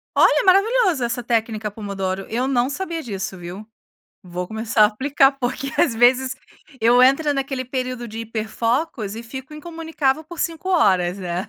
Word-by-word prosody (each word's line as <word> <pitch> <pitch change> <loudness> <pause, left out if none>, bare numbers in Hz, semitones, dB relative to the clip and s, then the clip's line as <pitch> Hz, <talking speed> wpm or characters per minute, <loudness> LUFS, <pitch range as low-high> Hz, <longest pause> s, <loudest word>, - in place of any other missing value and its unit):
Olha, - - +5
é - - -5
maravilhoso 390 - +3
essa 240 +1 -3
técnica 225 -2 -1
pomodoro, 195 -2 -4
eu 240 +3 -1
não 255 -1 +1
sabia 335 +2 -4
disso, 195 -7 -5
viu, 180 +4 -8 0.6
vou 180 0 -5
começar 220 0 +1
a - - +9
aplicar, 270 +6 +3
porque 260 +2 -3
às 235 - +3
vezes 250 +2 +3 0.5
eu 240 +2 +5
entro 275 +4 +4
naquele 270 -2 -3
período 255 -1 -4
de 220 +1 -8
hiper 225 -1 -4
focos 230 -2 -1
e 225 - -7
fico 265 +5 -9
incomunicável 320 -2 -2
por 340 +1 -8
5 330 +3 -3
horas, 190 - +3
né, 180 -1 -4
245 Hz, 165 wpm, -21 LUFS, 215-280 Hz, 0.6 s, a